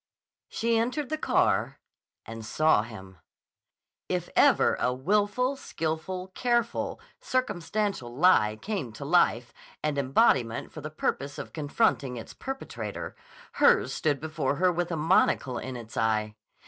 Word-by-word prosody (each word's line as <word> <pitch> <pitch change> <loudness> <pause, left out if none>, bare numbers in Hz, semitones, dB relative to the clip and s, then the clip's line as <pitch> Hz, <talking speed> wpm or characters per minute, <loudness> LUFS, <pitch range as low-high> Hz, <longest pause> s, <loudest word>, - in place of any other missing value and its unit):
She 230 0 +1
entered 255 +5 -1
the 310 - -1
car - - +1 0.5
and 115 0 -8
saw 155 +1 +3
him. 95 -5 -11 0.9
If - - -2
ever - - +5
a 125 - +1
willful, 205 - +1
skillful, 180 -2 -4
careful, 235 +3 -1 0.2
circumstantial 205 - -2
lie 125 -7 +4
came 190 - -4
to 140 - -8
life 120 - +2 0.3
and 150 -2 0
embodiment 130 - +2
for 155 - -9
the 155 - -5
purpose 140 -2 -3
of - - -7
confronting 145 - 0
its 115 - -9
perpetrator, 270 0 -6 0.4
hers - - +4
stood 145 -3 0
before 155 -3 -2
her 180 +4 +3
with 175 0 -2
a 165 - -1
monocle 150 -5 +2
in 130 0 -6
its 115 -2 -10
eye. 110 -1 0
155 Hz, 135 wpm, -28 LUFS, 125-205 Hz, 0.9 s, ever